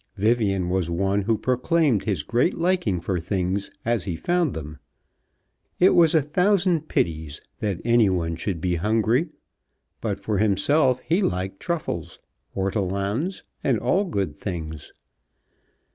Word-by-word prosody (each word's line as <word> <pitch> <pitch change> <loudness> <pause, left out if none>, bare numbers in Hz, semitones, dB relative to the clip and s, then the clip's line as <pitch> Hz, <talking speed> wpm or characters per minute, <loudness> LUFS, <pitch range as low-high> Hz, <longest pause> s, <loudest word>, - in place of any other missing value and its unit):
Vivian 100 -4 +1
was 90 -2 0
one 95 +4 +1
who 110 +2 +1
proclaimed 130 0 +1
his 95 -9 -1
great 120 - +1
liking 170 - +1
for 90 0 -1
things 95 +3 -2 0.2
as 115 -4 0
he 90 -4 -2
found 175 - 0
them. 75 -2 -7 1.0
It 185 - +6
was 165 -1 +5
a 155 - +4
thousand 180 0 +2
pities 80 -3 -1 0.2
that 100 -5 -2
any 120 -3 +4
one 85 -3 -1
should 85 0 -3
be 90 -1 0
hungry; 110 - +1 0.7
but, - - -2
for 105 -3 -1
himself, 125 +6 +2
he 170 +6 +1
liked 95 - -2
truffles, 85 - -3 0.4
ortolans, 100 - -1 0.2
and - - +2
all 200 +3 +1
good 100 - -2
things. 80 -5 -6
100 Hz, 135 wpm, -24 LUFS, 90-145 Hz, 1.0 s, It